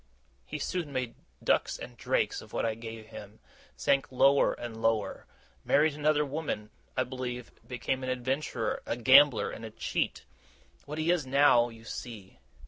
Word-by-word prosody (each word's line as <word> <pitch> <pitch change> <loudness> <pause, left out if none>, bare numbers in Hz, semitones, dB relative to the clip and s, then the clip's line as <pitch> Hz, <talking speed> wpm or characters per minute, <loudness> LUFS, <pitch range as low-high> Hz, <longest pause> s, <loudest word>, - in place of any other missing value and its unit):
He - - -4
soon 170 -5 -3
made 130 -3 -2 0.3
ducks - - +2
and - - -9
drakes - - 0
of - - -15
what - - 0
I 110 - +1
gave 115 -1 -9
him, 105 -1 -11 0.4
sank 140 0 +1
lower 135 +2 +4
and 115 -2 -7
lower, 115 -1 0 0.4
married 155 +1 +3
another 150 0 +2
woman, 140 -7 -4 0.3
I - - +3
believe, 125 -1 -5 0.2
became 130 +1 -2
an 130 - -2
adventurer, 130 -1 -2
a 115 - -1
gambler, 130 +1 +6
and 115 - -8
a 110 - -5
cheat. 110 - -2 0.6
What 150 +1 -6
he 160 +2 +2
is 165 -6 0
now, 130 -3 +5
you 115 -1 -13
see. 110 -4 -8
130 Hz, 160 wpm, -30 LUFS, 115-145 Hz, 0.6 s, gambler